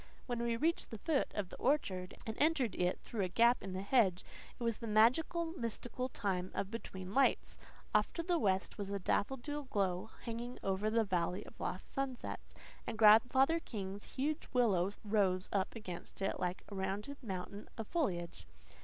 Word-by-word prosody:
When 240 -2 -2
we 235 -1 0
reached 330 +6 0
the 225 - -6
foot 295 +5 0
of 200 -4 -2
the - - -9
orchard 195 -10 0
and 220 - -3
entered 290 -7 +3
it 180 0 0
through 225 - -3
a 185 - +2
gap 235 +6 +4
in 190 0 -5
the 190 +1 -3
hedge 200 -5 +3 0.3
it - - -4
was 230 -2 0
the 230 - -6
magical, 305 +10 +3
mystical 245 0 -3
time 190 -6 -1
of 200 - -2
"between 190 -4 -6
lights." 270 +2 +2 0.3
Off - - +3
to 335 - -2
the 345 0 +1
west 195 -3 0
was 200 -1 -3
a 200 - -1
daffodil 270 +9 -1
glow 195 -3 0
hanging 235 +2 -4
over 195 +2 +1
the 225 +1 +3
valley 180 -2 -1
of - - -14
lost 185 - -4
sunsets, 270 -3 -4 0.3
and - - -3
Grandfather 245 +8 +6
King's 200 -7 -6
huge 295 +4 -1
willow 200 -7 +3
rose 200 -3 +2
up 195 +2 0
against 185 -6 -7
it 195 - -1
like 180 +1 -2
a - - -9
rounded 200 +9 -3
mountain 200 -2 -5
of 225 - -3
foliage. 180 - -2
215 Hz, 180 wpm, -35 LUFS, 190-255 Hz, 0.3 s, Grandfather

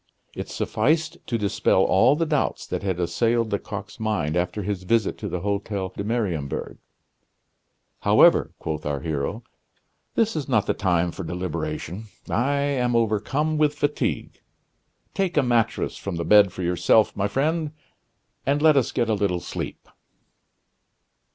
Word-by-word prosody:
It - - -5
sufficed 160 +3 0
to 115 - 0
dispel 100 -2 +2
all 110 +11 +4
the 165 +2 0
doubts 150 -3 -1
that - - -3
had 95 -3 -2
assailed 115 +6 +1
Lecoq's 105 +1 -5
mind 105 -9 -1
after 90 +4 -1
his 100 -1 -2
visit 110 +3 +1
to - - -4
the 90 - -3
Hotel 100 -1 -2
de - - -3
Mariembourg. 100 - -2 1.2
"However," - - +5
quoth 75 -1 -4
our 70 -2 -2
hero, 80 +8 -3 0.7
"this 225 -3 +2
is 145 -3 -3
not 110 -6 +3
the - - +1
time 90 -3 +1
for 95 - -7
deliberation. 85 +2 -4 0.2
I 135 +5 +1
am 125 -4 0
overcome 115 +8 +1
with 150 -1 +3
fatigue; 145 0 -2 0.7
take 190 -5 -1
a 145 - +5
mattress 120 -3 0
from 100 -3 -5
the 85 0 -3
bed 105 0 +6
for 90 - -6
yourself, 90 +5 +3
my 100 0 0
friend, 155 +8 0 0.7
and 140 +2 +1
let 155 -1 +5
us 130 - +2
get 120 -2 0
a 110 - +1
little 100 -3 0
sleep." - - -6
105 Hz, 150 wpm, -24 LUFS, 90-135 Hz, 1.2 s, bed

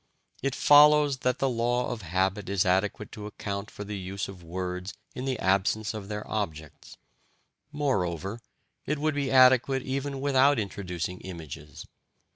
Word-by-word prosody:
It 140 0 -1
follows 145 -1 +6
that 125 -1 0
the 135 - +1
law 120 0 0
of 120 -2 -5
habit 95 +3 -1
is 100 0 +1
adequate 95 +3 0
to 105 -1 -7
account 100 0 -5
for 105 - -8
the 105 -1 -5
use 95 +1 -4
of 95 -2 -10
words 90 +2 -5 0.2
in 125 - -5
the 130 -2 -1
absence 100 +3 +1
of 105 -3 -7
their 105 0 -5
objects; 80 -8 -5 0.7
moreover, 100 - -1 0.5
it 150 - 0
would 155 +2 0
be 140 -2 -1
adequate 130 0 +5
even 135 +1 -3
without 140 0 +4
introducing 90 -4 -4
images. 75 -5 -9
105 Hz, 150 wpm, -28 LUFS, 95-130 Hz, 0.7 s, follows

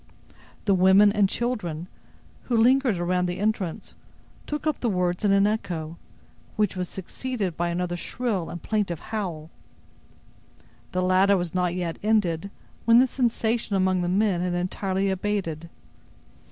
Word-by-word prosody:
The 200 - +4
women 190 +2 +6
and 200 -2 +2
children, 180 -10 -3 0.6
who 240 - +1
lingered 250 -2 +4
around 180 +1 0
the 180 0 -3
entrance, 200 -4 -2 0.5
took 300 +1 -4
up 310 -2 0
the 240 - 0
words 180 -2 0
in 205 - +3
an 195 0 +4
echo, 170 -6 -3 0.6
which 210 -4 +1
was 180 -1 -3
succeeded 195 -1 -4
by 175 +1 -1
another 175 0 -2
shrill 205 -1 -3
and 175 - -6
plaintive 200 -7 -1
howl. 170 -7 -4 1.4
The 185 0 0
latter 190 +2 +4
was 175 -2 -3
not 180 -1 0
yet 175 -2 -3
ended, 200 -4 +1 0.4
when 230 0 +6
the 255 - +7
sensation 235 -4 0
among 185 -1 +2
the 175 - -1
men 195 -1 +2
had 180 -1 -1
entirely 190 +2 -1
abated. 185 -5 -3
190 Hz, 145 wpm, -25 LUFS, 175-215 Hz, 1.4 s, the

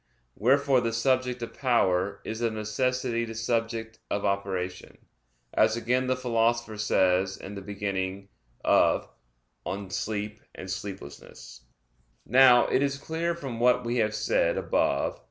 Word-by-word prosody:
Wherefore 135 +3 +3
the 115 -1 -1
"subject 125 0 0
of 115 - -6
power" 100 -6 +1
is 110 +1 -5
of 115 -2 0
necessity 115 +2 -1
"the 115 -1 -6
subject 115 0 -2
of 100 - -1
operation," 95 -2 -3 0.6
as 110 +1 +3
again 125 +2 0
the 130 - +2
Philosopher 120 -2 0
says 95 -2 +2
in 100 - -9
the 100 - -7
beginning 100 -1 -4 0.4
of - - +4 0.6
De - - -5
Somno 100 +2 -4 0.2
et - - -8
Vigilia. 95 -6 -7 0.9
Now, 125 0 +6
it - - +1
is 140 0 0
clear 165 +4 -2
from 135 -8 -6
what 125 0 +3
we 120 +1 -1
have 110 -2 +1
said - - +1
above - - 0
(Q. - - -27
115 Hz, 140 wpm, -27 LUFS, 100-125 Hz, 0.9 s, Now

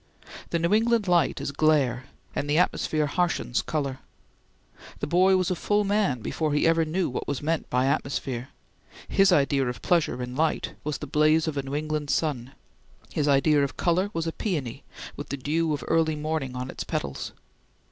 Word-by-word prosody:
The 170 - 0
New 170 +3 +1
England 225 -1 +3
light 175 -5 +2
is - - -3
glare, 140 -4 +2 0.3
and 145 - -2
the 150 - +2
atmosphere 155 -3 +1
harshens 175 -5 0
color. 140 -4 -2 1.0
The - - -1
boy 185 +4 +4
was 185 0 0
a - - +1
full 205 +4 +1
man 200 - +1
before 155 +5 -1
he 150 - +2
ever 165 0 +4
knew 170 +3 0
what 125 - -4
was 140 - -3
meant 160 +1 -1
by 125 +1 +2
atmosphere; 135 -2 -2 0.6
his 195 -1 +4
idea 140 -4 +3
of 125 - -5
pleasure 165 -7 +1
in 125 0 -6
light 160 +2 0
was 150 0 -2
the - - -6
blaze 155 +2 +3
of 155 - -2
a 140 - 0
New 135 +1 -5
England 150 -1 -2
sun. 135 -6 -1 0.6
His 150 - 0
idea 145 +1 +4
of 140 - -3
color 180 +3 +1
was 165 -3 -2
a 165 - -1
peony, 150 - -3 0.3
with - - -7
the 140 - -3
dew 155 +4 0
of 150 - -2
early 160 -1 +2
morning 150 -4 -3
on 125 +1 -4
its - - -5
petals. 70 -1 -4
155 Hz, 190 wpm, -26 LUFS, 135-170 Hz, 1.0 s, boy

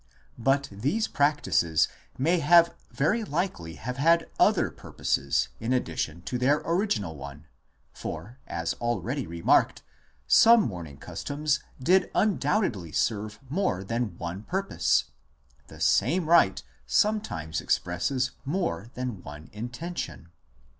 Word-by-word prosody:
But 135 +4 +2
these 145 - -1
practices 145 - +2 0.3
may 165 +5 +2 0.5
very 220 +12 +1
likely 150 - -3
have 125 - -5
had 165 +4 +3
other - - +4
purposes 70 0 -1
in 115 +3 -1
addition 85 -7 -2
to 125 - -3
their 140 +4 +2
original 165 - 0
one; 70 +2 -9 0.5
for, 105 - -7
as 85 -1 -2
already 120 +3 -2
remarked, 85 0 +2 0.4
some 230 - +7
mourning 85 -8 -6
customs 150 - -2 0.2
did 185 +8 +3
undoubtedly 190 - +1
serve 105 +1 -1
more 150 - -1
than 115 -3 -3
one 85 +3 -5
purpose; 190 - +1 0.6
the - - -13
same 180 0 +2
rite 155 - +4 0.2
sometimes 90 - 0
expresses 125 +9 0
more 135 - -2
than 125 -7 -4
one 75 +1 -11
intention. 120 - -6
125 Hz, 115 wpm, -27 LUFS, -, 0.6 s, some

